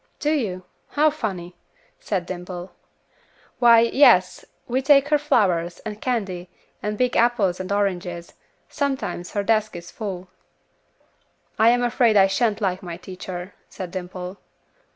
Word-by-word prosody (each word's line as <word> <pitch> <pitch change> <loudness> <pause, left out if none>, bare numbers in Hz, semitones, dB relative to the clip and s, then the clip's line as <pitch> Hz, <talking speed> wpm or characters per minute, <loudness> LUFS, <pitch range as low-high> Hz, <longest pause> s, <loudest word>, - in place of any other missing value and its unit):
"Do 295 - 0
you? 195 -12 -2 0.2
How 305 +1 +3
funny," 185 - -5 0.4
said 185 -4 -2
Dimple. 180 0 -7 0.9
"Why, 235 -2 +7
yes, 230 -7 +4 0.2
we 255 +2 0
take 275 +1 +4
her 300 -1 +3
flowers, 180 - +1
and 215 -1 -6
candy, 195 -8 -2 0.3
and 210 0 -3
big 250 +1 +1
apples 220 -7 +2
and 185 +1 -5
oranges; 180 -4 -2 0.3
sometimes 270 -11 -3
her 205 - 0
desk 215 -1 +1
is 175 0 -9
full." 190 -4 -6 1.3
"I 220 +1 +6
am 245 +1 +3
afraid 240 -2 +3
I 195 - +7
shan't 210 +2 0
like 185 -2 -1
my 175 -2 -7
teacher," 185 0 -8 0.2
said 185 -2 -7
Dimple. 180 +1 -6
200 Hz, 135 wpm, -23 LUFS, 180-240 Hz, 1.3 s, Why